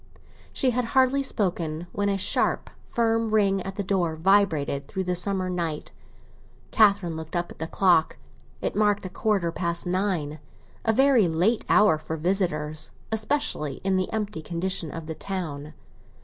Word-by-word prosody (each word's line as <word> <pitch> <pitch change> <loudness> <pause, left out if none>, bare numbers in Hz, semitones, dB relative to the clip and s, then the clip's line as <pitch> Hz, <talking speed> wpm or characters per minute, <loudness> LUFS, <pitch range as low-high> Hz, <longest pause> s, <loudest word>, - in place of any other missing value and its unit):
She 260 - +2
had 250 +1 0
hardly 265 +1 +4
spoken 175 - -2
when 205 0 0
a 200 - +1
sharp, 190 - +1 0.2
firm 225 -1 +1
ring 195 -2 +3
at 195 +1 -6
the 200 - -2
door 180 -4 0
vibrated 160 -6 +2
through 190 -1 -3
the 180 0 -1
summer 185 +1 +1
night. 170 -4 -3 0.8
Catherine 200 -6 +3
looked 160 +1 -7
up 175 0 -2
at - - -13
the 160 - -3
clock; 175 -3 +3 0.5
it - - -1
marked 205 -1 +2
a - - -4
quarter 190 -3 0
past 170 0 -2
nine—a 180 0 -3
very 260 -4 +4
late 180 +8 +1
hour 210 -7 +5
for 160 +1 -5
visitors, 155 -3 -1 0.2
especially 220 - 0
in 190 0 +1
the 185 0 -1
empty 210 -5 -3
condition 175 +1 -2
of 165 +1 -7
the 160 - -4
town. 155 -5 -5
185 Hz, 155 wpm, -25 LUFS, 160-205 Hz, 0.8 s, hour